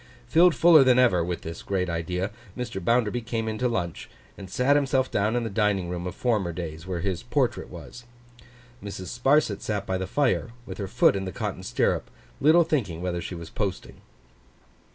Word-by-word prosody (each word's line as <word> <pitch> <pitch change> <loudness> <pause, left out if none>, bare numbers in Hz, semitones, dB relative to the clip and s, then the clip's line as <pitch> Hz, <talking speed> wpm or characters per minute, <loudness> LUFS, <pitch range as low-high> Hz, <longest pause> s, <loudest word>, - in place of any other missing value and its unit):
Filled 170 - +5
fuller 155 +3 +7
than 130 -1 +4
ever, 100 -9 +4
with 85 0 -3
this 85 0 -7
great 95 -2 -1
idea, 90 +3 -2 0.3
Mr. 120 -7 -4
Bounderby 120 +2 +1
came 115 -1 -3
in 110 0 -3
to 125 - +2
lunch, 90 -8 -3 0.3
and 95 -2 -10
sat 125 +8 +2
himself 135 -2 +1
down 105 +3 +1
in 120 - 0
the 115 - -3
dining 100 -4 +1
room 90 0 -4
of 90 - -6
former 105 -8 0
days, 80 -1 -7
where 90 -2 -3
his 95 -2 -2
portrait - - -1
was. 120 0 -11 0.8
Mrs. 100 0 -6
Sparsit 135 -5 +3
sat 105 -2 -2
by 95 -1 -2
the 95 - -3
fire, 125 -1 0
with - - -8
her 100 - -3
foot 110 0 +3
in 95 -1 -3
her - - -4
cotton - - -4
stirrup, - - 0 0.3
little 160 +5 +6
thinking 120 - -1
whither 90 -1 -2
she 90 - -6
was 85 -1 -9
posting. 100 -4 -4
105 Hz, 195 wpm, -26 LUFS, 90-125 Hz, 0.8 s, fuller